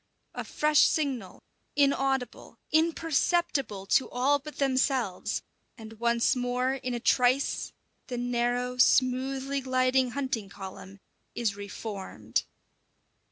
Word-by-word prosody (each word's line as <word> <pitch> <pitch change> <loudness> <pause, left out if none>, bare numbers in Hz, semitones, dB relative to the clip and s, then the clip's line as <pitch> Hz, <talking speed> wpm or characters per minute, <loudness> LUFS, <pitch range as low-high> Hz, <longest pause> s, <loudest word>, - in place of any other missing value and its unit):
A - - -4
fresh 300 0 +2
signal, 260 - -2 0.3
inaudible, 270 -2 0
imperceptible 315 - +1
to 260 - +2
all 275 +4 +2
but 300 +2 -10
themselves, 260 -7 0 0.3
and 220 -1 -11
once 235 +1 +2
more, 250 +1 0
in 255 -2 -3
a - - -2
trice, 250 +3 +2 0.4
the 245 - -4
narrow, 245 +1 -1
smoothly 265 +2 +2
gliding 255 0 +2
hunting 255 -6 -3
column 195 0 -10 0.4
is 225 -4 0
reformed. 195 - -4
255 Hz, 105 wpm, -28 LUFS, 235-275 Hz, 0.4 s, fresh